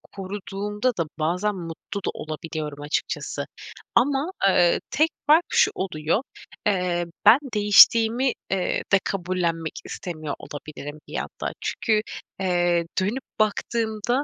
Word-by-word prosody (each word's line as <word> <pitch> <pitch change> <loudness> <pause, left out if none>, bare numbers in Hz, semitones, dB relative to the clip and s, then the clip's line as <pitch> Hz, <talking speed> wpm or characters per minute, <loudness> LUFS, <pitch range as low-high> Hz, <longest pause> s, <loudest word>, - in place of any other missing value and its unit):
koruduğumda 205 +4 -2
da 170 - +2 0.2
bazen 180 +7 0
mutlu 175 +3 -6
da - - +1
olabiliyorum 155 -2 -5
açıkçası. 145 +1 -2 0.5
Ama, 275 +7 +2 0.2
ııı, 175 -2 +4
tek 310 +3 +3 0.2
fark 315 +4 +6
şu - - +4
oluyor: 170 +1 -1 0.5
Eee, 180 -3 +1 0.2
ben 235 - +9 0.2
değiştiğimi, 225 +4 +6 0.2
eee, 190 -2 0
de 200 - +6
kabullenmek 175 -4 -1
istemiyor 155 -5 -5
olabilirim 145 0 -8
bir - - -11
yandan. - - -4
Çünkü, 215 -3 +1 0.4
eee, 175 -2 +2
dönüp 215 +8 -1 0.2
baktığımda, 220 +3 0
190 Hz, 115 wpm, -24 LUFS, 170-220 Hz, 0.5 s, ben